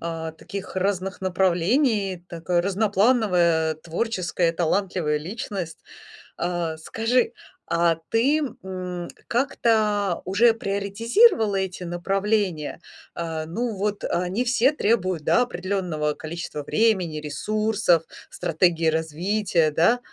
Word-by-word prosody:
а, 165 -1 -4
таких 195 +4 -8
разных 190 0 -1
направлений, 190 - +1
такая 175 +1 0
разноплановая, 195 -5 +2
творческая, 175 0 -1
талантливая 170 -2 0
личность. 180 0 -5 0.6
А 170 -2 -2
скажи, 225 +8 0 0.3
а 170 0 +2
ты, 270 +7 +3 0.2
м, 180 -2 -5 0.2
как-то 215 -6 +1
уже 225 +5 +4
приоритизировала 220 - +2
эти 190 -1 -2
направления? 185 -1 -1 0.4
А, 160 -2 -3
ну 230 +7 -2
вот, 205 +1 -2
они 180 +7 0
все 245 +2 +3
требуют, 185 - 0
да, 245 - +4
определенного 180 -8 -1
количества 160 -1 -6
времени, 185 -6 +1
ресурсов, 205 +4 +1 0.3
стратегии 165 0 +1
развития, 160 +2 +1
да? 175 +11 +3
185 Hz, 100 wpm, -24 LUFS, 170-215 Hz, 0.6 s, уже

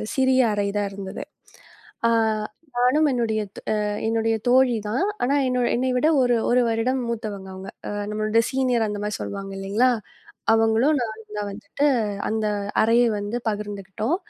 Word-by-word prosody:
சிறிய 260 -1 +4
அறைதான் 205 0 -1
இருந்தது. 195 0 -6 0.8
ஆ - - +3 0.7
நானும் 275 +5 +4
என்னுடைய 225 -3 0 0.7
என்னுடைய 225 0 +1
தோழிதான். 245 - +3 0.2
ஆனா 275 +3 +2
என்னோ 250 0 +1
என்னைவிட 255 +3 +1
ஒரு 245 -2 +3
1 250 - +4
வருடம் 250 +3 0
மூத்தவங்க 205 -4 -5
அவங்க. 190 +1 -8 0.2
அ - - -3 0.2
நம்மளோட 215 +1 +2
சீனியர் 250 -4 +1
அந்த 205 0 -4
மாதிரி 210 0 -3
சொல்லுவாங்க 195 -1 -5
இல்லீங்களா? 210 +6 +2 0.6
அவங்களும் 225 +7 +3
நானும் 220 -2 -6
தான் 205 - -2
வந்துட்டு 215 +8 -3 0.4
அந்த 220 0 -1 0.4
அறையை 230 +2 +4
வந்து 205 +4 -3
பகிர்ந்துக்கிட்டோம். 210 - -2
225 Hz, 130 wpm, -23 LUFS, 205-250 Hz, 0.8 s, சிறிய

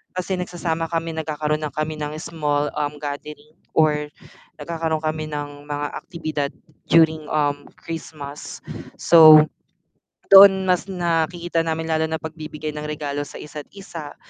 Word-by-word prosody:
kasi 185 +1 -2
nagsasama 165 -2 -2
kami, 165 0 -2
nagkakaroon 155 -1 -2
na - - -12
kami 155 0 -3
ng 150 0 -4
small, 150 -2 -1
um, 145 0 -2
gathering 150 +2 -7 0.2
or 150 -1 +3 0.5
nagkakaroon 160 -2 -3
kami 155 0 -2
ng 145 -1 -6
mga 145 0 -2
aktibidad 155 -4 -4 0.4
during, 160 -2 +4
um, 145 -1 0
Christmas. 150 -3 -8 0.3
So 155 -2 +8 0.9
doon 195 -1 +9
mas 180 +1 +1
nakikita 170 -1 0
namin 160 0 -2
lalo 160 0 0
na 160 - 0
pagbibigay 155 -1 -6
ng 150 - -5
regalo 145 -1 -3
sa - - -11
isa't 150 -1 -9
isa, 165 -7 -9
155 Hz, 135 wpm, -22 LUFS, 150-165 Hz, 0.9 s, doon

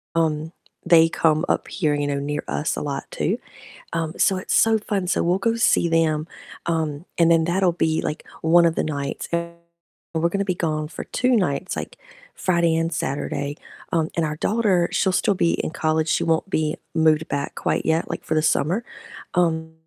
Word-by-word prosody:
uh - - +3
um, 155 +1 -1 0.3
they 165 -1 +6
come 160 0 +2
up - - 0
here, 155 -6 0
you 145 0 -1
know, 140 -1 -1
near 145 +1 -3
us 150 - -1
a - - -2
lot 140 -2 -3
too. - - -1 0.6
Um, 165 0 -2
so 190 - +3
it's 185 - -4
so 225 -1 +4
fun, 200 -3 -2
so - - +1
we'll 180 +2 +2
go 230 +3 +1
see 200 -6 +3
them, 160 -1 +1 0.4
um, 160 -1 -2
and 170 0 +5
then 165 -1 +4
that'll 180 +1 +2
be 160 -2 0
like 150 - -4 0.2
one 170 +1 +5
of 165 - +2
the - - +1
nights. 140 -2 -4
And 170 0 -2 0.6
we're 165 +1 +2
gonna 200 +1 -1
be 185 -2 0
gone 155 -2 -1
for - - -7
2 250 0 +1
nights, 180 -3 -1
like - - -6 0.4
Friday 170 -3 +1
and 165 +1 0
Saturday, 140 +1 -3 0.4
um, 160 -1 +1
and 165 -2 +1
our 150 - -3
daughter, 195 -2 +2
she'll 190 - +2
still 200 +2 +2
be 170 -2 +2
in - - -2
college, 160 -1 0
she - - +1
won't 165 +4 0
be 155 -3 0 0.2
moved 160 0 +3
back 140 0 -3
quite - - -1
yet, 160 +1 +1
like - - -4
for 160 - -1
the 155 - +2
summer. 170 +8 +1 0.5
Um, 160 -2 +1
165 Hz, 200 wpm, -23 LUFS, 155-175 Hz, 0.6 s, they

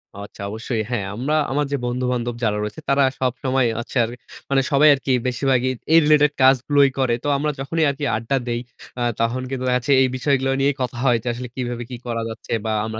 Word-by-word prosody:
আচ্ছা, 100 0 -10
অবশ্যই। 110 +1 -3
হ্যাঁ, 110 -5 -2
আমরা 140 +6 -1 0.2
আমার 145 +2 +1
যে 140 - +1
বন্ধু-বান্ধব 120 -1 -2
যারা 105 -1 +1
রয়েছে 105 +9 -6
তারা 140 0 +4 0.2
সবসময় 130 0 0
হচ্ছে 120 - -5
আর 115 - -2 0.4
মানে 135 -1 +3
সবাই 150 +2 +6
আরকি, 135 -1 -2 0.2
বেশিরভাগই 130 0 +1 0.2
এই 165 - +9
রিলেটেড 150 -1 +4
কাজগুলোই 135 +2 +4
করে। 130 -3 +2
তো - - -3
আমরা 150 +1 0
যখনই 160 +4 -1
আরকি 140 +1 -3
আড্ডা 115 +5 -1
দেই, 120 0 -1 0.4
আ - - -2 0.2
তখন 120 +3 0
কিন্তু 130 -1 -4
দেখা 125 - +2
যাচ্ছে 125 +3 -2
এই 130 - +4
বিষয়গুলো 135 -1 +1
নিয়েই 140 0 +2
কথা 125 -1 -3
হয়। 120 -2 +4
যে - - -7
আসলে 125 +1 -6
কিভাবে 120 -2 -3
কি 125 - -6
করা 115 -1 -2
যাচ্ছে, 110 0 -10
বা 110 - -1
আমরা 110 0 -5
130 Hz, 210 wpm, -21 LUFS, 120-140 Hz, 0.4 s, এই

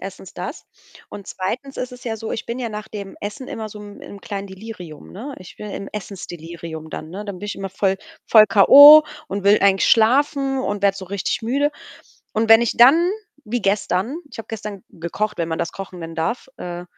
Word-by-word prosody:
1. 190 -1 -9
das 185 - -7 0.4
und 200 - -10
2. 250 +9 -5
ist 255 0 -4
es 250 - -12
ja 225 -2 -3
so, 220 0 -6
ich - - -4
bin 235 +2 -4
ja 240 - -2
nach 215 0 -7
dem 200 -3 -8
Essen 210 +6 -6
immer 220 -1 -5
so 210 0 -11
'n 205 0 -11
im 200 - -11
kleinen 200 0 -6
Delirium, 190 -5 -10
ne? 265 +9 -8
Ich 185 - -13
bin 210 - -8
im 195 - -6
Essensdelirium 170 -5 -8
dann, 155 0 -7
ne? 200 +4 -7
Dann 200 -3 -7
bin 205 - -6
ich 210 - -5
immer 195 0 -5
voll 195 0 0 0.3
voll 215 -2 +7
k.o. 285 +9 +10 0.2
und 200 +1 -4
will 205 +1 +6
eigentlich 195 -1 +3
schlafen 270 +4 +3
und 205 -5 -3
werde 200 -1 +3
so 195 - -7
richtig 195 +4 -3
müde. 280 +6 0 0.6
Und 220 0 0
wenn 225 +1 +8
ich 235 - -1
dann 315 +9 +6 0.3
wie 245 +2 -2
gestern 200 - 0
ich - - -12
habe 225 - -7
gestern 210 -3 -7
gekocht, 195 +6 -4
wenn 165 -1 -1
man 160 -1 -3
das 170 - -3
kochen 190 -2 -8
nennen 165 -1 -7
darf, 230 +12 -3
äh, 175 0 -6
205 Hz, 210 wpm, -21 LUFS, 190-230 Hz, 0.6 s, k.o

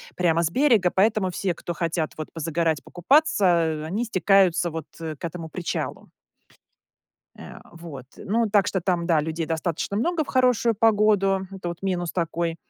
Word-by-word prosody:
прямо 170 -2 +2
с 160 - +1
берега, 225 -7 +3
поэтому 200 -1 +2
все, 180 0 -2
кто 175 - -5
хотят 165 -2 -2
вот 155 - -6
позагорать, 165 -1 -1
покупаться, 270 - +2
э, 165 -3 +2
они 200 +9 -2
стекаются, 190 -4 +3
вот, 160 -2 -6
э, 160 -2 -5
к 145 - -7
этому 165 -1 -6
причалу. 175 0 -4 1.3
Э, - - -10
вот, 165 -6 -10
ну, 225 +2 0
так 200 -1 +3
что 190 - 0
там, 175 -1 0
да, 165 -3 +3
людей 160 +2 -3
достаточно 165 +4 -2
много 330 +7 0
в - - -18
хорошую 250 -2 +2
погоду, 205 -3 +3
это 190 -2 -7
вот 170 -1 -6
минус 180 -3 -2
такой. 170 -1 -2
175 Hz, 165 wpm, -24 LUFS, 165-205 Hz, 1.3 s, берега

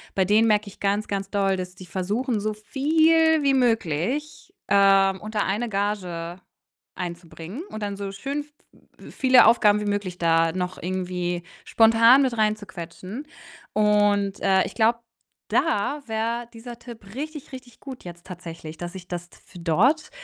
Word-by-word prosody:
bei 190 - +2
denen 215 +4 +4
merke 210 -1 +2
ich - - -17
ganz, 205 +2 0
ganz 195 -1 -3
doll, 195 -2 +1
dass 180 0 -6
die 185 0 -11
versuchen, 205 +7 -2
so 215 +1 -2
viel 315 +7 +3
wie 275 -1 +3
möglich, 245 - -1 0.2
ähm, 195 -1 +4
unter 215 0 -2
eine 220 +5 -1
Gage 185 -4 -3 0.6
einzubringen 175 - -7
und 215 -1 -6
dann 200 -1 -3
so 200 -1 -5
schön 280 +8 -4
v 300 - -25 0.5
v - - -12
viele 260 -1 +5
Aufgaben 210 -2 +4
wie - - -3
möglich 200 -3 -2
da 165 -1 +3
noch 180 0 -4
irgendwie 180 -1 -3 0.2
spontan 230 +4 +6
mit 250 -3 0
reinzuquetschen 205 - -3 0.5
und 205 -1 +2
äh, 190 0 +3
ich - - -7
glaube, 230 +1 +3 0.5
da 290 -1 0
wär 230 +2 -2
dieser 235 +1 -10
Tipp 220 -5 -12
richtig, 300 0 -6
richtig 255 -3 -12
gut 265 -8 -10
jetzt 175 0 -10
tatsächlich, 165 -3 -9
dass 175 +2 -7
ich 180 -1 -9
das 175 -1 -5
f - - -21
dort, 220 - +2
205 Hz, 155 wpm, -24 LUFS, 185-235 Hz, 0.6 s, spontan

